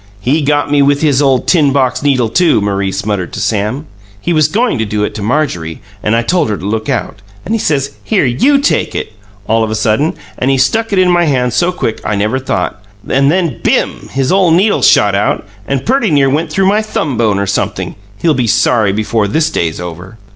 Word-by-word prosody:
"He 135 +10 0
got 145 0 0
me 145 -1 +3
with 140 +2 +2
his 145 -3 +3
ole 135 -2 +3
tin 150 -6 +2
box 130 -2 0
needle, 135 -5 +1
too," 170 +1 +3
Maurice 100 -1 -2
muttered 100 -5 -2
to - - -5
Sam. 110 +7 -1 0.3
"He 175 - -1
was 155 -2 +3
goin' 220 - 0
to - - +1
do 105 0 -2
it - - -2
to 105 - -6
Marjorie, 100 - -2 0.2
and 105 - +1
I 115 - +1
told 170 0 +1
her 105 - -1
to - - -8
look 110 +3 -2
out, 120 -5 -3 0.2
and 220 - -2
he 225 - +1
says, 140 -7 0
'Here, 200 -9 +1
YOU 200 - +3
take 280 +1 0
it!' 110 - -4 0.3
all 115 +1 +2
of 110 - -2
a 110 - -2
sudden, 110 +8 0 0.2
and 130 - 0
he 135 - +2
stuck 220 - +1
it 200 - 0
in 185 -1 +4
my 175 -1 +3
hand 125 -5 0
so 175 +1 +1
quick 115 -10 -3
I 105 - -1
never 105 +6 0
thought. 100 -5 -3 0.2
And 140 +2 +2
then, 170 -8 -1
BIM! - - 0
his 135 -1 -1
ole 190 -2 +3
needle 190 +6 +3
shot 105 -1 +4
out 100 +1 -1 0.2
and 135 -1 -2
perty 250 -2 +1
near 140 -3 +3
went 155 +3 -1
through 190 +4 +1
my 210 +2 +2
thumb 160 - -3
bone 110 -3 +1
or 100 - -1
sumpthing. 100 - -2 0.3
He'll 165 - +3
be 125 -4 0
sorry 110 -1 +2
before 110 +1 0
this 160 +9 0
day's 80 - -2
over!" 90 +4 -8
130 Hz, 225 wpm, -13 LUFS, 105-160 Hz, 0.3 s, in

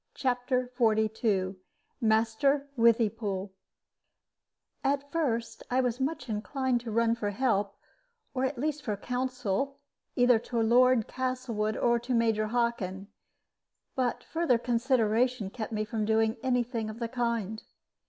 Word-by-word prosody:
CHAPTER 250 -1 0
XLII 215 -4 +1 0.4
MASTER 230 +6 +2
WITHYPOOL 220 -4 +1 1.3
At 280 +1 0
first 245 -8 -1
I 255 - +2
was 245 -1 -1
much 275 +3 -2
inclined 245 +3 -1
to 235 - -7
run 230 +1 +3
for 220 -3 -2
help, 205 -3 0 0.6
or 255 - -1
at 265 0 -1
least 300 +3 -1
for 210 -6 -3
counsel, 250 +2 -2 0.4
either 245 -2 +5
to 235 +1 -3
Lord 240 +1 +4
Castlewood 250 -4 -2
or 235 0 +2
to 245 +2 -2
Major 225 -2 +2
Hockin; 215 -5 -1 0.9
but 255 -2 -1
further 325 -7 +1
consideration 235 -2 +1
kept 225 -1 -5
me 215 -1 -1
from 215 0 -2
doing 220 +1 +2
any 250 -2 +2
thing 230 -2 -4
of 215 - -7
the 235 -1 -2
kind. 230 -3 -2
235 Hz, 130 wpm, -29 LUFS, 220-255 Hz, 1.3 s, either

